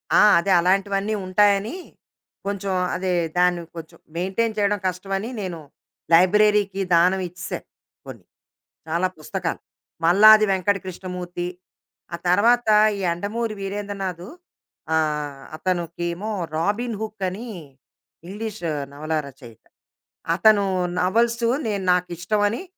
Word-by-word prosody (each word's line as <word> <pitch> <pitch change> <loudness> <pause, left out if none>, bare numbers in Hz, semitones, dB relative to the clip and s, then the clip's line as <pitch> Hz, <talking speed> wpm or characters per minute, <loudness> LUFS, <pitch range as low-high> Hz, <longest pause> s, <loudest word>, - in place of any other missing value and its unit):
ఆ! - - +7 0.2
అదే, 195 +3 -1
అలాంటివన్ని 195 +3 +1
ఉంటాయని. 200 - +2 0.7
కొంచెం 200 -1 -2 0.2
అదే 185 0 -2 0.3
దాన్ని, 180 -1 +3
కొంచెం 160 -1 -10 0.2
మెయింటైన్ 195 +6 -1
చేయడం 205 0 +1
కష్టమని, 195 +4 -3
నేను 180 -4 -5 0.5
లైబ్రేరీకి 200 +2 +4
దానం 180 +3 +3
ఇచ్చేసాను. 180 +2 -7 0.4
కొన్ని. - - -10 0.6
చాలా 170 +3 +1
పుస్తకాలు. 175 +2 -4 0.5
మల్లాది 215 +5 +7
వెంకట 195 +1 +1
కృష్ణమూర్తి, 180 -1 -5 0.7
ఆ - - -7
తర్వాత 230 +5 +3 0.3
ఈ - - -6
'యండమూరి 205 +6 -2
వీరేంద్రనాధు.' 195 -2 -5 0.7
ఆహ్, 150 -3 -1
అతనుకేమో 175 +3 -3 0.2
'రాబీన్ 210 +8 -1
హుక్' 215 -2 -6
అని, 210 +7 -7 0.8
ఇంగ్లీషు 205 -3 -5 0.2
నవలా 155 +2 -2
రచయిత. 125 -5 -14 0.7
అతను 205 +2 +4 0.4
నవల్సు 230 +5 +1 0.2
నేను 200 -3 -2
నాకిష్టమని 190 - 0
190 Hz, 100 wpm, -23 LUFS, 175-210 Hz, 0.8 s, ఆ